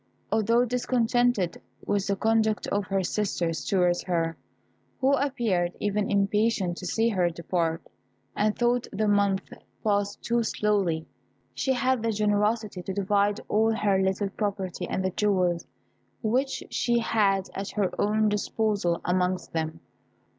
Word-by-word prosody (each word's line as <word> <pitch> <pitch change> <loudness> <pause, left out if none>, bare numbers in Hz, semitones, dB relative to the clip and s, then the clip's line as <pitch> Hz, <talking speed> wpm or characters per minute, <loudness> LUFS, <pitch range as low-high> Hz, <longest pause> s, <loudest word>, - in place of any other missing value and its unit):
Although 230 +3 +3
discontented 240 -5 +1 0.2
with 200 -1 0
the 200 - +1
conduct 220 +1 +1
of 200 -1 0
her 195 0 0
sisters 170 -6 -1
towards 180 +2 +2
her, 165 -2 0 0.6
who 265 +1 +3
appeared 235 -11 0
even 205 0 0
impatient 200 -2 +1
to 180 - -5
see 225 +5 +2
her 185 -5 +2
depart, 170 -1 -2 0.5
and 210 0 +1
thought 240 0 +1
the 215 +1 0
month 200 -1 +1 0.3
passed 205 -1 0
too 235 0 +1
slowly, 200 -7 0 0.5
she 265 - 0
had 260 -1 +1
the 230 0 0
generosity 210 -1 0
to 190 +2 -5
divide 200 +1 +1
all 220 +1 +2
her 200 -3 +2
little 190 +1 0
property 195 -3 -3
and 190 - -1
the 185 - 0
jewels 180 -4 +1 0.6
which 260 +5 0
she 240 -1 +1
had 200 -4 +1
at 195 +1 -4
her 200 -3 0
own 215 +1 +2
disposal 205 -3 0
amongst 180 0 0
them. 160 -1 -3
205 Hz, 140 wpm, -27 LUFS, 185-220 Hz, 0.6 s, Although